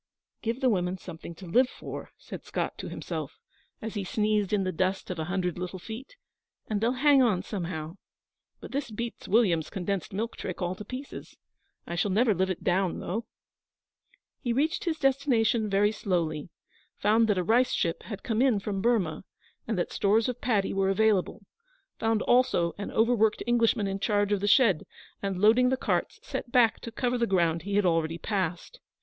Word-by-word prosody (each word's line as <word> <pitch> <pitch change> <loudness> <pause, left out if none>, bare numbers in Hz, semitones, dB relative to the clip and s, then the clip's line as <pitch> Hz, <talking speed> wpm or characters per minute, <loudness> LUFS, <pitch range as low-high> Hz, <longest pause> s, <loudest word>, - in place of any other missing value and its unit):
'Give 235 +3 -2
the 260 - +4
women 180 -2 0
something 170 -2 -9
to 185 - -11
live 250 +9 +3
for,' - - -8
said - - -9
Scott - - -3
to - - -5
himself, - - -5 0.5
as 225 - -4
he 205 -3 -2
sneezed 210 0 0
in 205 -2 +2
the 185 - -1
dust 185 +2 -1
of 175 - -5
a 160 - -2
hundred 180 -1 -2
little 180 +1 -4
feet, 225 - -9 0.5
'and 210 -2 -1
they'll 235 +2 +2
hang 280 +1 +5
on 205 -7 +2
somehow. 170 -4 -5 0.6
But - - -10
this 275 -2 -2
beats 235 +2 -6
William's 185 -7 +3
condensed 190 0 -3
milk 220 +4 -3
trick 185 - -5
all 180 0 -1
to 190 - -8
pieces. 255 +6 -8 0.5
I - - -6
shall 180 +4 0
never 215 +3 +3
live 190 +1 0
it 185 - -4
down, 185 0 +1
though.' 220 +6 -4 1.1
He 240 - -2
reached 315 - 0
his 330 -2 0
destination 255 -6 +2
very 200 +1 +3
slowly, 170 -7 -2 0.5
found 220 +2 +3
that 210 -3 +2
a 180 - +1
rice 240 +7 +3
ship 165 -1 0
had 205 -4 -8
come 225 0 0
in 260 -5 +4
from 195 -1 -3
Burmah, 195 -9 +1 0.4
and 220 -3 -1
that 175 - -1
stores 215 +3 +2
of 250 -1 -4
paddy 215 -6 +1
were 195 0 +1
available; 200 -1 +1 0.5
found 225 -1 +1
also 240 -9 +3
an 200 - -4
overworked 220 -1 +2
Englishman 230 -3 +2
in 195 0 -2
charge 205 -1 +1
of 205 - +2
the 205 - -1
shed, 205 - +4 0.3
and, 195 -2 -2
loading 225 +6 +5
the 260 - +1
carts, - - -1
set 240 - -5
back 235 -3 +4
to 230 - -8
cover 245 +1 -1
the 235 - +2
ground 170 -4 +2
he 200 +4 -3
had 205 -1 +3
already 165 -1 +1
passed. 185 - -3
205 Hz, 190 wpm, -28 LUFS, 185-235 Hz, 1.1 s, hang